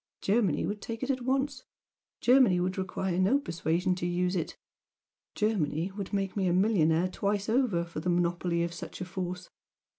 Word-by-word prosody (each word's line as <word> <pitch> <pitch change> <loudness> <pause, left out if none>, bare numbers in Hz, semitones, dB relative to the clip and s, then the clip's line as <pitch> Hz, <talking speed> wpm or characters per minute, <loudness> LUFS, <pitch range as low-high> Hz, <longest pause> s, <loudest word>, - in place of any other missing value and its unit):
Germany 200 -5 +2
would 205 0 -4
take 230 +2 -5
it 265 - +1
at 260 -1 -2
once 265 +1 0 0.6
Germany 245 -8 +5
would 185 +1 -1
require 185 -1 -2
no 195 +9 +4
persuasion 170 - 0
to 175 - -2
use 180 +1 0
it! 170 - -3 0.8
Germany 185 -5 0
would 195 -1 -6
make 195 -2 -1
me 195 -3 +1
a 175 - +2
millionaire 180 -4 +3
twice 200 +2 -1
over 220 -8 +2
for 170 -2 -6
the 180 - -2
monopoly 175 0 +1
of 170 0 -3
such 170 - -8
a - - -2
force! 180 0 -5
185 Hz, 175 wpm, -29 LUFS, 175-215 Hz, 0.8 s, Germany